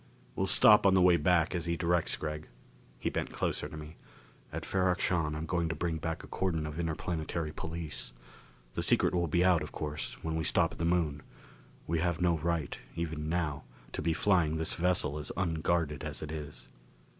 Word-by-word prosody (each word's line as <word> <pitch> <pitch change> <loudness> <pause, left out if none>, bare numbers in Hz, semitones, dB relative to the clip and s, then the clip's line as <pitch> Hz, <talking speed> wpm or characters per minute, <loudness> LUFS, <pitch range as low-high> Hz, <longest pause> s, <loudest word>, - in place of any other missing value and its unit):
"We'll - - 0
stop - - +7
on 95 - +5
the 95 - +5
way 90 -1 +7
back, 85 0 +3
as 85 -1 -2
he 85 0 -1
directs, 85 0 +2
Gregg." 75 0 -5 0.5
He - - -2
bent - - -2
closer - - -2
to - - -8
me. 75 +1 -9 0.5
"At - - -5
Ferrok 95 -1 +1
Shahn 80 -6 +1
I'm 80 +1 -3
going 85 0 0
to 80 - -2
bring 85 -2 -1
back 80 +2 -4
a - - -10
cordon 85 -5 -1
of 75 +2 -5
Interplanetary 80 -1 -2
Police. 80 -5 -5 0.6
The - - -2
secret - - +3
will 85 -1 +1
be 85 +3 +2
out, 90 -4 +4
of 75 - -6
course, 75 -1 -4
when 80 0 -2
we 80 - -1
stop 80 +2 +3
at - - -11
the 85 - 0
Moon. 85 -4 +1 0.6
We 85 +1 0
have 85 -1 0
no 85 -2 +2
right, 80 -2 -1 0.2
even 80 -2 -3
now, 80 -4 -1 0.3
to - - -3
be 85 +1 +1
flying 85 -5 +2
this 80 0 0
vessel 85 -4 +1
as 75 - -5
unguarded 80 -4 0
as 75 -1 -5
it 75 - -5
is." 75 -2 -7
80 Hz, 200 wpm, -31 LUFS, 75-85 Hz, 0.6 s, stop